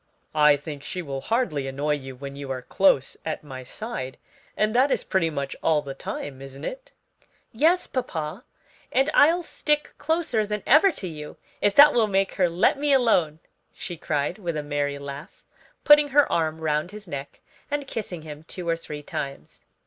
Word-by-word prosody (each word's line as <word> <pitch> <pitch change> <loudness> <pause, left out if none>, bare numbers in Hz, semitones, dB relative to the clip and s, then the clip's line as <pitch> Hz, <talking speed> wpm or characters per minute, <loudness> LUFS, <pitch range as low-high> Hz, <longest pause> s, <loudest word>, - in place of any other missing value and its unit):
I 150 -1 +5
think 145 0 -8
she 180 +5 -5
will 135 -3 -5
hardly 185 - 0
annoy 140 +3 -1
you 135 -2 -6
when 140 +1 -8
you 140 -1 -7
are 130 -1 -4
close 140 -7 +2
at 160 -1 -4
my 130 -3 -8
side; 130 - -6 0.4
and 215 0 +2
that 260 +4 +4
is - - 0
pretty 185 -4 +1
much 140 -3 -4
all 155 -2 +2
the 140 -1 -6
time, 135 0 -6
isn't 135 +1 -8
it?" - - -7 0.6
"Yes, 325 +10 +3
papa, 175 - -4 0.5
and 270 +4 +2
I'll 330 +5 +5
stick 300 -2 -1
closer 320 -8 0
than 210 0 -3
ever 315 +8 +6
to 190 - -3
you 150 -3 -8 0.2
if 205 - +2
that 295 +1 +9
will 225 -3 +3
make 195 -1 +1
her 180 - +5
let 180 +10 +2
me 290 0 +1
alone," 175 - +3 0.3
she 175 - -6
cried, 150 +3 -2
with 170 -5 -3
a 150 - -3
merry 145 -1 -1
laugh, 140 +4 -9 0.4
putting 295 0 +7
her 285 +1 +5
arm 160 -1 0
round 155 +1 0
his 210 0 -10
neck 140 -3 -7 0.3
and 290 0 -2
kissing 190 - -5
him 150 -1 -9
two 175 0 -6
or 165 - +2
three 150 -3 -8
times. 140 -1 -6
165 Hz, 185 wpm, -25 LUFS, 145-235 Hz, 0.6 s, that